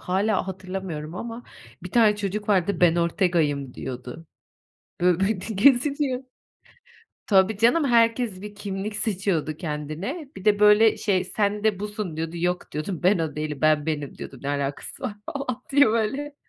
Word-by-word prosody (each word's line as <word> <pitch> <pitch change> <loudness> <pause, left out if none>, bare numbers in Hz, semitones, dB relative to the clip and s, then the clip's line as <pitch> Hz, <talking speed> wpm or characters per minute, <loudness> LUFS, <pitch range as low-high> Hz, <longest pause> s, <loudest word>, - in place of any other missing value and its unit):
hâlâ 195 +2 0
hatırlamıyorum 185 -4 -5
ama 230 +4 -6 0.4
bir 180 - -7
tane 220 -2 +4
çocuk 205 +1 -3
vardı, 190 -2 +2
"Ben 175 -1 +5
Ortega'yım" 165 -6 0
diyordu. 125 +5 -7 0.7
Bö 180 0 +3
bö 195 - +3
d 220 +3 -5
geziniyor. 265 +3 +3 1.0
Tabii 195 +1 +4
canım, 245 +8 +4
herkes 230 -5 +2
bir 210 0 -8
kimlik 205 0 -5
seçiyordu 190 -8 -1
kendine. 165 - -5
Bir 190 - -9
de, 205 -1 +4
böyle 210 +1 +6
şey, 190 -4 0
"Sen 205 +2 -1
de 210 -3 +1
busun." 205 -5 -4
diyordu, 165 +1 -4
"Yok," 180 +1 -2
diyordum, 155 +3 -4
"ben 185 +1 +4
o 155 -2 -3
değilim, 150 -2 -4
ben 155 -1 +3
benim" 150 -3 -3
diyordum, 135 - -9
"Ne 140 - -3
alakası 140 - -3
var?" 245 -6 -3 0.2
falan 255 -3 -4
diye, 285 -2 +6
böyle. 230 +7 -1
195 Hz, 155 wpm, -24 LUFS, 165-220 Hz, 1.0 s, böyle